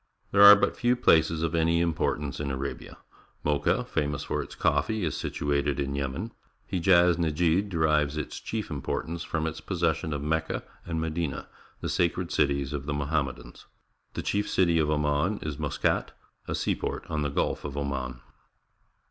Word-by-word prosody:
— - - -42
There 100 - +4
are 100 0 +12
but 105 - +1
few 120 +1 +2
places 80 -8 +3
of 80 -1 -1
any 85 0 +2
importance 75 -4 -1
in 75 -1 -2
Arabia. 70 0 -5 0.5
Mocha, 75 -1 +1
famous 75 -2 -2
for - - -2
its - - -9
coffee, 110 -2 +1
is 80 - -2
situated 70 -1 -1
in 70 -1 -1
Yemen. 70 - -3 0.4
Hejaz 90 -1 +4
Nejd 85 +4 +1
derives 75 -3 +1
its 75 - -4
cliief 110 -5 -4
importance 80 +3 -3
from 80 -1 -2
its 80 -1 -4
posses - - 0
sion 80 - -5
of 70 -1 -3
Mecca 80 +1 -1 0.2
and 80 -2 -2
Medina 80 -2 -3 0.2
— - - -30
the - - -3
sacred 85 0 0
cities 70 -1 +1
of 70 0 -4
the 75 - -1
Mohammedans. 70 -4 -3 0.5
The - - -3
chief 105 0 -1
city 85 -3 +3
of 75 -1 +1
Oman 75 +6 +1
is 75 -2 -4
Muscat, - - 0 0.3
a - - -1
seaport - - -2
on 75 - -2
the 75 - 0
Gtilf 70 - -1
of 70 -1 -6
Oman. 65 -3 -3
75 Hz, 175 wpm, -27 LUFS, 70-85 Hz, 0.5 s, are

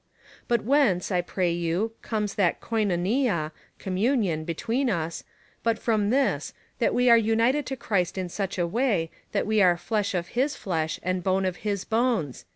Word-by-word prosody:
But 235 -2 +1
whence, 230 -9 +2
I 180 -1 +2
pray 175 0 -1
you, 170 +6 -1
comes 210 -3 -2
that 185 -4 +1
Koivoivia 200 - 0 0.3
(communion) 190 - 0
between 230 - -1
us, 165 -4 -2 0.4
but 230 -1 +1
from 215 -3 +1
this, 270 +3 0 0.2
that - - +2
we 250 0 +3
are 235 -1 +8
imited 230 +6 +2
to 270 - -3
Christ 195 -6 -1
in 185 -1 -2
such 195 +2 -4
a 175 - +1
way, 195 -4 0 0.2
that - - 0
we 215 0 +2
are 180 -2 +5
flesh 200 +2 -1
of 170 -1 -2
his 265 +4 0
flesh, 160 -4 -2
and 185 0 -1
bone 190 +1 +1
of 185 -1 -2
his 200 -3 -3
bones 225 - 0
200 Hz, 170 wpm, -26 LUFS, 175-230 Hz, 0.4 s, are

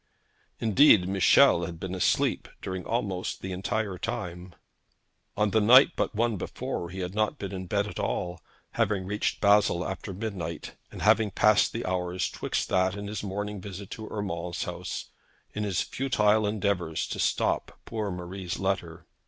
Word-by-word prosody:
Indeed 110 -4 +6
Michel 95 -2 +5
had 85 -2 -8
been 95 +1 -5
asleep 95 - +1
during 95 -1 -5
almost 100 -6 -2
the 95 - -4
entire 95 +1 -2
time. 90 -5 -5 0.8
On 105 -1 +2
the 110 - +3
night 125 +6 +8
but - - -1
one 115 -1 +1
before 85 -1 -4
he 95 +1 -6
had 90 +1 -4
not 110 +7 0
been 100 -5 -5
in 95 -1 -5
bed 100 0 +1
at 105 - -7
all, 90 -1 -2 0.3
having 95 -3 0
reached 105 +2 -2
Basle 100 -4 +4
after 95 +1 -5
midnight, 90 -5 -5 0.2
and - - -7
having 110 -2 +4
passed 105 +2 +4
the 115 - -4
hours 90 0 -1
'twixt - - -2
that 95 0 +2
and 100 0 -6
his 105 -1 -4
morning 105 0 -4
visit 100 0 -8
to 110 -1 -7
Urmand's 90 -5 -3
house - - -5 0.4
in 105 - -2
his 100 -4 0
futile 110 -5 +2
endeavours 100 -6 -1
to - - -5
stop - - 0
poor 110 -3 -3
Marie's 90 0 -5
letter. 90 -4 -2
95 Hz, 160 wpm, -28 LUFS, 90-105 Hz, 0.8 s, night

